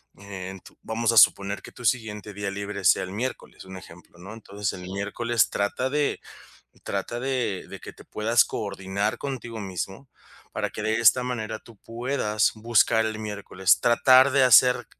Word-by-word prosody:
en 95 -1 -8
tu - - -17
vamos 115 +1 -1
a 115 - 0
suponer 100 -1 +4
que - - -12
tu 125 - -11
siguiente 110 -3 -2
día 100 0 -4
libre 100 0 -6
sea 85 - +4
el 95 - -7
miércoles, 120 +6 -6
un 95 0 -10
ejemplo, 90 -1 -15
¿no? 95 +4 -10
Entonces 105 -2 -5
el 90 0 -9
miércoles 110 +4 -1
trata 115 +6 -1
de 145 0 0 0.7
trata 100 +5 -4
de 125 -7 -2
de - - -9
que - - -10
te - - -15
puedas 115 +2 +2
coordinar 100 0 -3
contigo 120 -5 -6
mismo 95 +6 -6 0.4
para - - -2
que - - -7
de 110 +1 0
esta 120 +2 +5
manera 110 -3 -4
tú 115 -4 -18
puedas 115 -2 -1
buscar 110 0 +2
el 110 -1 -4
miércoles, 100 -3 0
tratar 130 +3 +5
de 140 0 +3
hacer 125 0 +5
110 Hz, 170 wpm, -25 LUFS, 100-120 Hz, 0.7 s, esta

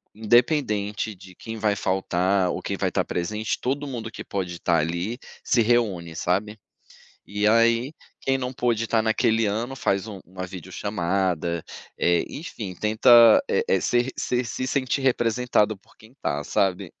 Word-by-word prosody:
independente 110 -3 +1
de 95 0 -15
quem 110 +4 -7
vai 105 -1 +1
faltar 95 0 +1
ou - - -4
quem - - -3
vai - - 0
estar - - -1
presente, 105 +5 -2
todo 140 +3 -2
mundo 115 -4 -5
que - - -8
pode 95 -3 -4
estar 85 0 +1
ali 85 +9 -2 0.2
se 120 - +3
reúne, 105 -8 +1
sabe? 100 +6 -1 0.7
E 105 +1 0
aí, 115 +5 +3 0.3
quem 135 - +1
não 125 -1 -3
pôde 120 -2 0
estar 115 -1 +2
naquele 110 0 +2
ano 115 +6 -2
faz 100 -5 -1
um 100 -3 -8
uma 95 +1 -7
vídeochamada, 90 -2 -2 0.3
eh, 85 -1 +2
enfim, 110 - -7
tenta, 115 - +6
eh - - +1
eh, 475 - +3
ser 120 +1 +1
ser 125 0 0
se 130 +3 -4
sentir 135 0 0
representado 120 -4 +1
por 95 - -26
quem 110 +2 -18
tá, 75 +1 -1
sabe? 95 0 0
110 Hz, 160 wpm, -24 LUFS, 95-120 Hz, 0.7 s, tenta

